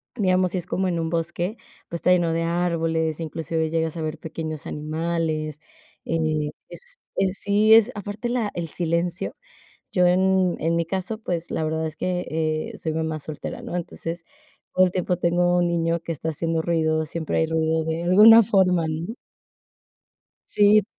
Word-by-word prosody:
digamos, 185 Hz, -4 st, +2 dB
si 185 Hz, -, -2 dB
es 175 Hz, -, -7 dB
como 190 Hz, 0 st, 0 dB
en 170 Hz, -2 st, -1 dB
un 165 Hz, 0 st, -1 dB
bosque, 170 Hz, +5 st, -2 dB, 0.3 s
pues, 170 Hz, -, -4 dB
está -, -, +1 dB
lleno 170 Hz, -2 st, +3 dB
de 165 Hz, -, 0 dB
árboles, 165 Hz, -2 st, 0 dB
inclusive 160 Hz, 0 st, -2 dB
llegas 160 Hz, 0 st, -1 dB
a -, -, -3 dB
ver 155 Hz, 0 st, -3 dB
pequeños 155 Hz, -1 st, -5 dB
animales, 155 Hz, 0 st, -2 dB, 0.5 s
eh, 155 Hz, -2 st, 0 dB, 0.2 s
es -, -, -8 dB, 0.2 s
es 195 Hz, 0 st, +1 dB
Sí, 210 Hz, +2 st, +4 dB
es 225 Hz, +2 st, +5 dB
aparte 205 Hz, +3 st, -4 dB
la 235 Hz, -4 st, 0 dB
el 170 Hz, -2 st, -3 dB
silencio. 170 Hz, +1 st, -1 dB, 0.6 s
Yo 180 Hz, -2 st, +4 dB
en 185 Hz, 0 st, +3 dB
en 165 Hz, +1 st, +1 dB
mi 165 Hz, -, 0 dB
caso, 195 Hz, +5 st, -3 dB
pues 175 Hz, -5 st, -3 dB
la 160 Hz, -, -1 dB
verdad 160 Hz, +1 st, -1 dB
es 155 Hz, -, -8 dB
que, 180 Hz, -1 st, -1 dB
eh, 155 Hz, 0 st, -2 dB
soy 160 Hz, -1 st, -3 dB
mamá 160 Hz, -1 st, -2 dB
soltera, 150 Hz, 0 st, -6 dB
¿no?, -, -, -5 dB
entonces, 170 Hz, -1 st, -5 dB, 0.5 s
todo 185 Hz, 0 st, +6 dB
el -, -, -4 dB
tiempo 180 Hz, -1 st, 0 dB
tengo 175 Hz, 0 st, +2 dB
un 175 Hz, 0 st, +3 dB
niño 170 Hz, 0 st, 0 dB
que 165 Hz, -, -5 dB
está 160 Hz, +2 st, -4 dB
haciendo 165 Hz, +1 st, -1 dB
ruido, 160 Hz, -2 st, +1 dB
siempre 160 Hz, 0 st, -3 dB
hay 160 Hz, -, +3 dB
ruido 160 Hz, 0 st, 0 dB
de 160 Hz, +1 st, -2 dB
alguna 215 Hz, +6 st, +8 dB
forma, 185 Hz, -5 st, +3 dB
¿no? 165 Hz, +7 st, -3 dB, 1.3 s
Sí. 205 Hz, 0 st, +5 dB
170 Hz, 175 wpm, -24 LUFS, 160-185 Hz, 1.3 s, alguna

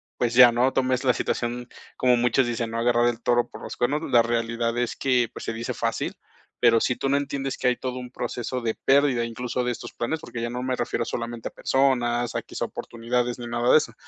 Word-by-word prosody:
pues, 120 Hz, -1 st, 0 dB
ya 120 Hz, -1 st, +8 dB
no 125 Hz, +3 st, +3 dB
tomes 130 Hz, -1 st, 0 dB
la 130 Hz, -, +4 dB
situación, 120 Hz, +1 st, -2 dB, 0.3 s
como 125 Hz, -1 st, +4 dB
muchos 120 Hz, +1 st, +2 dB
dicen: 115 Hz, -1 st, -2 dB
"no 115 Hz, -, -2 dB
agarrar 120 Hz, 0 st, +3 dB
el 120 Hz, -1 st, -5 dB
toro 120 Hz, 0 st, +2 dB
por -, -, -11 dB
los -, -, -6 dB
cuernos". 145 Hz, +5 st, 0 dB
La 120 Hz, -3 st, +6 dB
realidad 115 Hz, 0 st, -1 dB
es 120 Hz, -1 st, -1 dB
que, 125 Hz, -3 st, +2 dB
pues -, -, -8 dB
se -, -, -3 dB
dice 115 Hz, +1 st, -4 dB
fácil, -, -, -2 dB, 0.5 s
pero 115 Hz, -1 st, +5 dB
si 125 Hz, -, +1 dB
tú 135 Hz, -, -2 dB
no 140 Hz, +1 st, +3 dB
entiendes 135 Hz, -1 st, -3 dB
que -, -, -1 dB
hay 125 Hz, -, +3 dB
todo 125 Hz, 0 st, -4 dB
un 125 Hz, -1 st, -8 dB
proceso 125 Hz, 0 st, -4 dB
de 115 Hz, -1 st, -1 dB
pérdida, 135 Hz, -2 st, +3 dB
incluso 120 Hz, +2 st, -3 dB
de 125 Hz, -, 0 dB
estos 120 Hz, 0 st, -7 dB
planes, 140 Hz, +7 st, -2 dB
porque 120 Hz, -5 st, -7 dB
ya 120 Hz, -, -2 dB
no 125 Hz, +1 st, -4 dB
me 130 Hz, 0 st, -1 dB
refiero 120 Hz, -, -2 dB
solamente 115 Hz, -1 st, -4 dB
a -, -, -25 dB
personas, 120 Hz, -3 st, +1 dB
a -, -, 0 dB
equis -, -, -6 dB
oportunidades 120 Hz, +1 st, -2 dB
ni 120 Hz, -, -7 dB
nada 120 Hz, +1 st, +1 dB
de -, -, +8 dB
eso, 120 Hz, -7 st, -1 dB
120 Hz, 235 wpm, -25 LUFS, 120-125 Hz, 0.5 s, ya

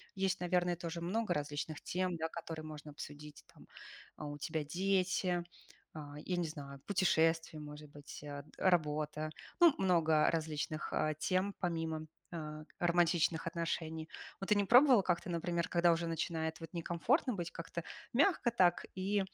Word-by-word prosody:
есть 190 Hz, -1 st, 0 dB
наверное 180 Hz, 0 st, +2 dB
тоже 170 Hz, 0 st, -5 dB
много 190 Hz, +3 st, 0 dB
различных 150 Hz, +1 st, -3 dB
тем, 180 Hz, -1 st, -1 dB
да, 160 Hz, -, -1 dB
которые 165 Hz, -2 st, -6 dB
можно 150 Hz, -1 st, -8 dB
обсудить, 145 Hz, 0 st, -9 dB
там. -, -, -17 dB, 0.7 s
У 145 Hz, -, -7 dB
тебя 155 Hz, +1 st, -2 dB
дети, 185 Hz, +1 st, +1 dB, 0.5 s
а, 145 Hz, -2 st, -7 dB
я 180 Hz, -, 0 dB
не 170 Hz, -2 st, 0 dB
знаю, 140 Hz, -3 st, -8 dB
путешествия, 165 Hz, -4 st, +2 dB
может 150 Hz, 0 st, -9 dB
быть, 145 Hz, 0 st, -10 dB
э, 145 Hz, -1 st, -6 dB
работа. 155 Hz, -3 st, +1 dB, 0.3 s
Ну, 340 Hz, -4 st, +8 dB
много 160 Hz, -5 st, +4 dB
различных, 155 Hz, -1 st, -2 dB
а, 155 Hz, -, +1 dB
тем, 185 Hz, +6 st, 0 dB
помимо, 165 Hz, -3 st, -2 dB, 0.2 s
а, 155 Hz, -2 st, -6 dB, 0.2 s
романтичных 170 Hz, -1 st, +3 dB
отношений. 165 Hz, -2 st, -3 dB, 0.3 s
Вот, 195 Hz, -, -5 dB
ты 210 Hz, -, +5 dB
не 205 Hz, -, +3 dB
пробовала 250 Hz, 0 st, +7 dB
как-то, 175 Hz, 0 st, 0 dB
например, 170 Hz, 0 st, -1 dB
когда 170 Hz, 0 st, +4 dB
уже 170 Hz, 0 st, 0 dB
начинает 160 Hz, -1 st, -2 dB
вот, 165 Hz, 0 st, -9 dB
некомфортно 175 Hz, -, +1 dB
быть, 170 Hz, -2 st, -4 dB
как-то 170 Hz, 0 st, -5 dB, 0.3 s
мягко 280 Hz, -1 st, +3 dB
так 180 Hz, -6 st, +3 dB
и, 195 Hz, +2 st, +1 dB
170 Hz, 150 wpm, -35 LUFS, 155-180 Hz, 0.7 s, Ну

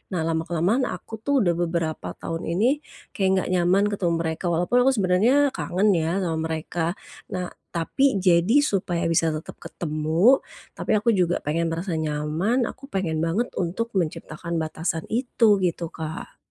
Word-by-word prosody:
Nah, 160 Hz, -, 0 dB
lama-kelamaan 170 Hz, +9 st, 0 dB
aku 220 Hz, -1 st, -7 dB
tuh 270 Hz, 0 st, +2 dB
udah 175 Hz, -, +3 dB
beberapa 170 Hz, -2 st, -2 dB
tahun 165 Hz, 0 st, -5 dB
ini, 255 Hz, +9 st, +2 dB, 0.3 s
kayak 190 Hz, -1 st, 0 dB
nggak 185 Hz, -, -1 dB
nyaman 185 Hz, +2 st, +3 dB
ketemu 180 Hz, -4 st, 0 dB
mereka 165 Hz, +1 st, -3 dB
walaupun 175 Hz, +8 st, +2 dB
aku -, -, +6 dB
sebenarnya 225 Hz, +9 st, +3 dB
kangen 200 Hz, -1 st, +1 dB
ya 170 Hz, +2 st, 0 dB
sama 160 Hz, -2 st, -1 dB
mereka. 160 Hz, +2 st, -2 dB, 0.3 s
Nah, 180 Hz, -1 st, -4 dB, 0.2 s
tapi 210 Hz, +10 st, +1 dB
jadi 190 Hz, +9 st, +4 dB
supaya 180 Hz, -, 0 dB
bisa 165 Hz, 0 st, +3 dB
tetep 155 Hz, -, -8 dB
ketemu, 160 Hz, -, +2 dB, 0.3 s
tapi -, -, -1 dB
aku 215 Hz, +3 st, +3 dB
juga 180 Hz, -4 st, +1 dB
pengen 165 Hz, +3 st, 0 dB
merasa 165 Hz, 0 st, -2 dB
nyaman, 155 Hz, -, 0 dB
aku 270 Hz, +4 st, -6 dB
pengen 175 Hz, -, -2 dB
banget 170 Hz, +9 st, 0 dB
untuk 190 Hz, +7 st, -2 dB
menciptakan 170 Hz, -1 st, -3 dB
batasan 160 Hz, +1 st, -2 dB
itu, 225 Hz, -4 st, +3 dB
gitu, 170 Hz, -2 st, -1 dB
Kak. 160 Hz, 0 st, -7 dB
175 Hz, 155 wpm, -24 LUFS, 165-210 Hz, 0.3 s, aku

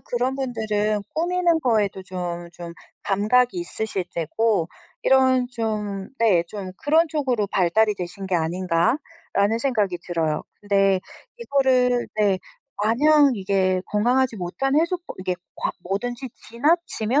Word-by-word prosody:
그런 255 Hz, +1 st, -1 dB
분들은 215 Hz, -5 st, -1 dB
꾸미는 345 Hz, 0 st, +1 dB
거에도 210 Hz, -7 st, +1 dB
좀 175 Hz, -2 st, -5 dB
좀 170 Hz, 0 st, -9 dB, 0.3 s
감각이 225 Hz, -, +2 dB
있으실 220 Hz, -, -1 dB
테고 175 Hz, +2 st, 0 dB, 0.3 s
이런 260 Hz, -1 st, +4 dB
좀 210 Hz, -4 st, -3 dB
네, 205 Hz, -7 st, +4 dB
좀 190 Hz, -2 st, -7 dB
그런 320 Hz, +7 st, +3 dB
쪽으로 255 Hz, -9 st, 0 dB
발달이 205 Hz, +3 st, +2 dB
되신 185 Hz, +1 st, -6 dB
게 185 Hz, -, -1 dB
아닌가 170 Hz, -, +1 dB, 0.3 s
라는 205 Hz, +3 st, +2 dB
생각이 215 Hz, -8 st, 0 dB
들어요. 160 Hz, -3 st, -1 dB, 0.2 s
근데 195 Hz, -2 st, +2 dB, 0.4 s
이거를 255 Hz, -, +2 dB
네, 205 Hz, -3 st, +2 dB, 0.4 s
마냥 285 Hz, +5 st, +4 dB
이게 190 Hz, -2 st, +1 dB
건강하지 240 Hz, +3 st, +1 dB
못한 200 Hz, +10 st, -2 dB
해소법 345 Hz, +2 st, -2 dB
이게 185 Hz, -1 st, -2 dB, 0.2 s
과 -, -, -2 dB
뭐든지 240 Hz, +7 st, -3 dB, 0.2 s
지나치면 280 Hz, -1 st, +1 dB
215 Hz, 270 characters per minute, -23 LUFS, 190-260 Hz, 0.4 s, 이런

